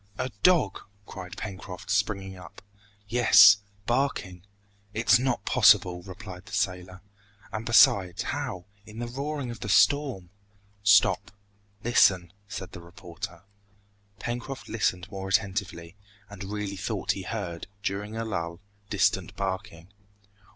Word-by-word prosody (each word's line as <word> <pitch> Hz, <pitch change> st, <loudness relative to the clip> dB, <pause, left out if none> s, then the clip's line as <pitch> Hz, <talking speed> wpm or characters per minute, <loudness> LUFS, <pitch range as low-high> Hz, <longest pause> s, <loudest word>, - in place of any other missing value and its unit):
"A 130 Hz, 0 st, -3 dB
dog!" 170 Hz, -, +3 dB, 0.3 s
cried 90 Hz, -3 st, -9 dB
Pencroft, 95 Hz, -3 st, -7 dB
springing 100 Hz, -1 st, -1 dB
up. 90 Hz, -, -13 dB, 0.4 s
"Yes 100 Hz, -3 st, +7 dB, 0.3 s
barking 120 Hz, -8 st, -1 dB, 0.3 s
" 100 Hz, 0 st, -36 dB
"It's 115 Hz, +1 st, +4 dB
not 125 Hz, -5 st, -1 dB
possible!" 95 Hz, -7 st, +4 dB
replied 95 Hz, 0 st, -10 dB
the 95 Hz, -, -12 dB
sailor. 90 Hz, -2 st, -2 dB, 0.5 s
"And 110 Hz, +1 st, -5 dB
besides, 100 Hz, -6 st, +5 dB
how, 90 Hz, -1 st, -4 dB, 0.2 s
in 110 Hz, +1 st, -13 dB
the 120 Hz, -, -3 dB
roaring 140 Hz, +1 st, -4 dB
of 115 Hz, -, -9 dB
the 105 Hz, -, -6 dB
storm 125 Hz, -6 st, +3 dB, 0.3 s
" 100 Hz, 0 st, -35 dB
"Stop 95 Hz, -1 st, 0 dB, 0.5 s
listen 95 Hz, -7 st, +3 dB
" 100 Hz, -, -38 dB
said 95 Hz, -2 st, -7 dB
the 85 Hz, -, -10 dB
reporter. 85 Hz, -1 st, -9 dB, 0.7 s
Pencroft 120 Hz, +3 st, -5 dB
listened 90 Hz, -5 st, -1 dB
more 95 Hz, -1 st, -5 dB
attentively, 95 Hz, -4 st, -1 dB, 0.4 s
and 100 Hz, -1 st, -8 dB
really 100 Hz, -1 st, -4 dB
thought 105 Hz, +1 st, -2 dB
he 100 Hz, -, -4 dB
heard, 90 Hz, -3 st, -5 dB, 0.2 s
during 105 Hz, +2 st, -3 dB
a 115 Hz, -, -2 dB
lull, 85 Hz, -5 st, -4 dB, 0.3 s
distant -, -, +1 dB
barking. 95 Hz, -3 st, -5 dB
100 Hz, 130 wpm, -27 LUFS, 90-110 Hz, 0.7 s, Yes